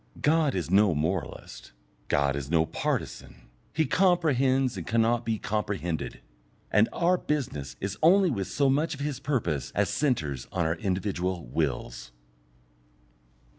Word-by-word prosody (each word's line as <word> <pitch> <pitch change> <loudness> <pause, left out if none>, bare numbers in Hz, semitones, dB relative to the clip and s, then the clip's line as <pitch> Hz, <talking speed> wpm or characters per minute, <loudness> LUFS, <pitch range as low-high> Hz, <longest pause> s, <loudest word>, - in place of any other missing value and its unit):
God 155 -2 +3
is 90 -2 -3
no 100 -3 +4
moralist, 80 -4 -4 0.3
God 70 -2 +1
is 70 -1 -5
no 80 -1 +3
partisan; - - -4 0.2
He 160 +1 +1
comprehends 135 - +2
and 90 -4 -6
cannot 115 +1 +2
be 110 -1 0
comprehended, 100 -6 -3 0.5
and 105 +2 +4
our 180 +1 +2
business 75 - -3
is 100 0 -4
only 180 +2 +5
with 100 -6 -2
so 140 - +1
much 150 +4 +1
of - - -14
His 145 -3 -3
purpose 120 - -1
as - - +2
centres 80 - -1
on 85 -3 0
our 80 +1 +1
individual 95 - -2
wills. - - -3
105 Hz, 135 wpm, -27 LUFS, -, 0.5 s, only